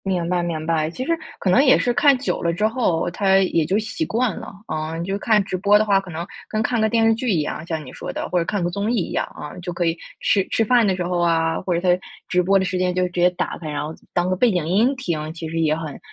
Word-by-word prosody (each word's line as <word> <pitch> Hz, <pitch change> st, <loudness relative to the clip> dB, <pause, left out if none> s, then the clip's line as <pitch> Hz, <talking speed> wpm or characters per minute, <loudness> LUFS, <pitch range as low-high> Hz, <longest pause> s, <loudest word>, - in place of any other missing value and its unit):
明 180 Hz, -3 st, -1 dB
白 180 Hz, -1 st, +1 dB
明 165 Hz, -2 st, -3 dB
白。 160 Hz, -1 st, +1 dB
其 255 Hz, +10 st, -5 dB
实 335 Hz, -, -1 dB, 0.3 s
可 190 Hz, -, 0 dB
能 250 Hz, +10 st, +5 dB
也 265 Hz, -, +6 dB
是 245 Hz, -, +1 dB
看 285 Hz, -2 st, +5 dB
久 255 Hz, -, -2 dB
了 170 Hz, -, +1 dB
之 210 Hz, +6 st, +1 dB
后 220 Hz, -8 st, 0 dB
它 190 Hz, +1 st, +3 dB
也 180 Hz, -4 st, +2 dB
就 190 Hz, +6 st, +1 dB
习 225 Hz, +9 st, -2 dB
惯 235 Hz, -, 0 dB
了。 -, -, -8 dB, 0.2 s
嗯， 155 Hz, +1 st, -3 dB
你 -, -, -3 dB
就 195 Hz, +1 st, -2 dB
看 215 Hz, -2 st, +3 dB
直 190 Hz, -, -4 dB
播 200 Hz, +3 st, +4 dB
的 215 Hz, -, +2 dB
话， 200 Hz, -2 st, +4 dB
可 195 Hz, -1 st, -10 dB
能 165 Hz, 0 st, -5 dB, 0.2 s
跟 215 Hz, -, -1 dB
看 235 Hz, 0 st, 0 dB
个 220 Hz, -, +3 dB
电 225 Hz, 0 st, +2 dB
视 225 Hz, -, +5 dB
剧 235 Hz, +2 st, -2 dB
一 170 Hz, -5 st, +2 dB
样， 155 Hz, +1 st, -4 dB
像 160 Hz, -2 st, -3 dB
你 130 Hz, -, -10 dB
说 -, -, -6 dB
的， -, -, -4 dB
或 180 Hz, -, +1 dB
者 170 Hz, -, -1 dB
看 200 Hz, 0 st, -1 dB
个 175 Hz, -, 0 dB
综 200 Hz, +5 st, -2 dB
艺 -, -, +1 dB
一 180 Hz, -, -2 dB
样。 -, -, -1 dB
嗯， 150 Hz, +4 st, -8 dB
就 175 Hz, 0 st, -4 dB
可 175 Hz, 0 st, -1 dB
以 165 Hz, 0 st, +1 dB, 0.2 s
吃 195 Hz, -2 st, +2 dB
吃 225 Hz, -, +1 dB
饭 240 Hz, 0 st, +4 dB
的 190 Hz, -2 st, +2 dB
时 180 Hz, -, -2 dB
候 175 Hz, 0 st, -1 dB
啊， 165 Hz, -1 st, +1 dB
或 185 Hz, -1 st, -1 dB
者 170 Hz, -, +1 dB
在 180 Hz, 0 st, +2 dB, 0.3 s
直 180 Hz, -, +2 dB
播 195 Hz, +2 st, +3 dB
的 190 Hz, -, +1 dB
时 185 Hz, -, -2 dB
间 180 Hz, 0 st, +1 dB
就 185 Hz, 0 st, +1 dB
直 180 Hz, -, -5 dB
接 180 Hz, -, +6 dB
打 175 Hz, -, -3 dB
开， 155 Hz, -, -6 dB
然 145 Hz, -1 st, -3 dB
后 155 Hz, +2 st, -5 dB, 0.2 s
当 175 Hz, 0 st, +1 dB
个 185 Hz, -, +1 dB
背 235 Hz, +5 st, +3 dB
景 175 Hz, -5 st, -1 dB
音 225 Hz, +10 st, +3 dB
听， 160 Hz, -10 st, -3 dB
其 165 Hz, -1 st, -6 dB
实 165 Hz, +1 st, -3 dB
也 155 Hz, -1 st, +2 dB
很 155 Hz, -3 st, -6 dB
180 Hz, 325 characters per minute, -22 LUFS, 165-215 Hz, 0.3 s, 也